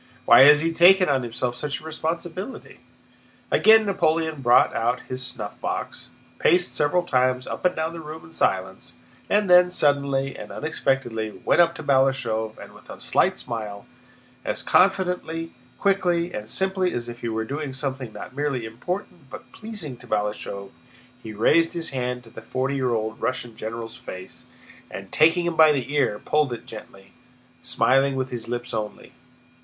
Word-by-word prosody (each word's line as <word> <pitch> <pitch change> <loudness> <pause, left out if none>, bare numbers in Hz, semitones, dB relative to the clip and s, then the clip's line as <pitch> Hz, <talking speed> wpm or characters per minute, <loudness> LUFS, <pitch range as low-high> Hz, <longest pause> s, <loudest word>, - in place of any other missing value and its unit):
Why 120 - +8
has 150 +1 +7
he 165 +1 0
taken 185 +2 +6
on 135 -2 +2
himself 120 +1 -3
such 145 +1 -4
a - - -18
responsibility?" 165 +7 -5 0.7
Again 220 0 +6
Napoleon 160 -6 0
brought 120 -1 +4
out 120 +2 0
his 130 0 -6
snuffbox, 110 -5 -5 0.3
paced 180 0 +3
several 160 +5 +1
times 130 -4 +1
up - - -6
and 180 - +3
down 160 +1 -2
the 170 - -7
room 155 0 -9
in 85 - -16
silence, - - -1 0.3
and 205 0 +2
then, 180 0 +7
suddenly 140 -4 +1
and - - -9
unexpectedly, 120 -8 -2
went - - +5
up 170 - +3
to - - -8
Balashëv 130 -6 +1
and - - -12
with - - -18
a - - -9
slight - - +1
smile, 105 -3 -6 0.6
as - - -2
confidently, 180 -4 +1 0.3
quickly, 180 -3 +1
and 105 +1 -6
simply 190 - 0
as 120 0 -4
if 120 0 -8
he 120 - -4
were 110 0 -2
doing 145 +3 -4
something 130 -2 -5
not 130 - -10
merely 140 -5 -2
important 150 - -6
but - - -11
pleasing 205 - -8
to - - -15
Balashëv, 105 -1 -3 0.5
he 110 - -8
raised 160 - +3
his 170 -1 -4
hand 125 -1 -3
to 115 - -16
the - - -10
forty 130 +4 -2
year 130 -2 0
old 110 -1 -2
Russian 125 -3 -3
general's 115 +1 -6
face 95 0 -10 0.4
and, 95 0 -9
taking 165 +2 +4
him 170 -1 -1
by 155 -1 +7
the 140 -1 -2
ear, 135 -8 +1
pulled 150 +3 0
it 120 - -8
gently, 100 -3 -12 0.5
smiling 135 +1 +2
with 130 0 -3
his 120 -2 -6
lips 120 +1 -4
only. 105 -2 -5
135 Hz, 170 wpm, -24 LUFS, 120-165 Hz, 0.7 s, Why